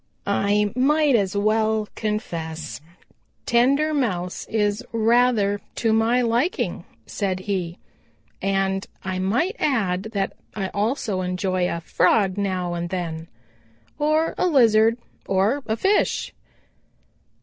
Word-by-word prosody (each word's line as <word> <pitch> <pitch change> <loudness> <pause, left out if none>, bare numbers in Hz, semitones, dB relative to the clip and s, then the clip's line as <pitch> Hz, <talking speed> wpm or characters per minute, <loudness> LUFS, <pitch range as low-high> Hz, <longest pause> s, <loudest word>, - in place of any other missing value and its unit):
"I 205 0 +1
might 295 +3 +3
as 200 -2 +1
well 215 +1 +1
confess 165 -8 -4
that 150 - -27 0.6
tender 275 +6 +3
Mouse 185 -11 -2
is 210 -1 0
rather 225 -3 +2
to 225 -2 +1
my 230 +3 +3
liking," 240 +10 0 0.2
said 190 -3 -2
he, 185 -3 -3 0.6
"and 195 0 0 0.2
I 185 -1 -3
might 245 - 0
add 200 -9 0
that 195 -2 -1 0.2
I 195 -3 -2
also 210 -2 -1
enjoy 180 0 -1
a 170 - -3
Frog 185 +3 +2
now 185 -3 -2
and 170 0 -3
then, 165 -3 -4 0.7
or 310 +2 +2
a - - +3
Lizard 230 -6 +4 0.3
or 200 +9 +1
a 220 0 -1
fish." 395 - +1
205 Hz, 115 wpm, -23 LUFS, 185-235 Hz, 0.7 s, Lizard